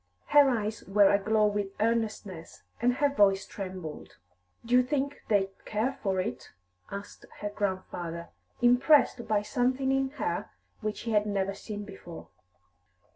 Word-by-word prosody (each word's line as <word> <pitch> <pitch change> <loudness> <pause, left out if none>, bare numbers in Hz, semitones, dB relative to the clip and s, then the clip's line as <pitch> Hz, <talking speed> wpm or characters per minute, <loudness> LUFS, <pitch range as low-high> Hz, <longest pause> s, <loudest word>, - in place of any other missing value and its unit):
Her 290 -2 +7
eyes 220 -3 -2
were 200 0 +5
aglow 215 +2 +3
with 205 -1 -1
earnestness, 215 -6 -2 0.2
and 245 +1 +3
her 285 +2 +3
voice 195 -6 +4
trembled. 185 -6 -7 0.5
"Do 235 - -2
you 250 - +7
think 280 +2 -2
they'd 195 -2 +2
care 220 +5 -1
for 190 -3 0
it?" 125 -8 -4 0.4
asked 200 +1 -8
her 205 - -2
grandfather, 180 -4 -3 0.3
impressed 250 0 +4
by 210 -1 +1
something 260 +2 +1
in 270 0 +1
her - - -2 0.3
which 215 -2 -3
he 230 - -3
had 210 -1 +2
never 195 -1 0
seen 205 +1 -7
before. 185 -4 -10
210 Hz, 140 wpm, -29 LUFS, 195-245 Hz, 0.5 s, Her